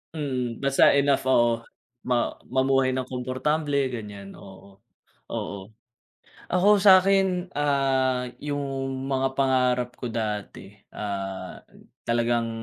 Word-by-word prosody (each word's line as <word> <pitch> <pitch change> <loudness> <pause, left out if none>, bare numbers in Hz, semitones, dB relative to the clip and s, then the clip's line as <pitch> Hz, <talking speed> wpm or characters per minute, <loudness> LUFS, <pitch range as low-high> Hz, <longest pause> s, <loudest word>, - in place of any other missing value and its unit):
Mm, 130 -5 -3
basta 140 0 +5
enough, 140 -2 +2
oo. 120 -2 +3 0.4
Ma 125 -1 +1 0.2
mamuhay 130 0 +2
ng 130 - -1
komportable, 140 +2 -1
ganyan, 105 -4 -8
oo. 95 0 -15 0.5
Oo. 95 -1 -5 0.8
Ako 200 +3 +4
sa 190 -1 +8
akin, 190 -2 +1
ah, 135 -3 +1 0.2
yung 145 -1 -3 0.4
mga 135 -1 -1
pangarap 125 -2 +1
ko 125 - -3
dati, 105 -3 -5 0.2
ah, 95 -2 -5 0.5
talagang, 120 0 +1
130 Hz, 105 wpm, -25 LUFS, 115-140 Hz, 0.8 s, sa